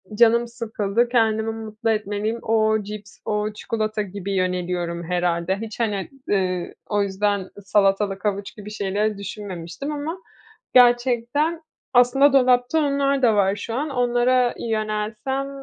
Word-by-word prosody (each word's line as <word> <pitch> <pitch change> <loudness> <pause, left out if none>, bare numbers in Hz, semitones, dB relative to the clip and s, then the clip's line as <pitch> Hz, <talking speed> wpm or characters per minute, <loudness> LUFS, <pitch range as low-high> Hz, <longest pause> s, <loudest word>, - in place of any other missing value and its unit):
“Canım 235 +1 +4
sıkıldı, 230 -1 -1
kendimi 225 -2 +2
mutlu 220 0 -4
etmeliyim. 215 +1 -1
O 220 -1 +2
cips, 205 0 -9
o 210 0 -1
çikolata.” 215 0 -2
gibi 200 0 -5
yöneliyorum 180 -2 -1
herhâlde. 175 +1 0
Hiç 225 +1 -7
hani, 205 -4 -1 0.2
ııı, 185 -3 0 0.2
o 205 -1 +2
yüzden 200 0 -1
salatalık, 195 0 +1
havuç 200 -1 -2
gibi 210 0 -9
şeyleri 210 0 -1
düşünmemiştim. 200 - -6
Ama 300 +4 -4 0.6
gerçekten, 250 +6 +3 0.3
aslında 255 +3 +5
dolapta 250 +3 +4
onlar 280 -1 +1
da 230 -4 +4
var 195 0 +3
şu 225 +2 -6
an. 290 +5 -1
Onlara 245 -1 +2
yönelsem, 215 +4 -2
215 Hz, 125 wpm, -23 LUFS, 200-245 Hz, 0.6 s, aslında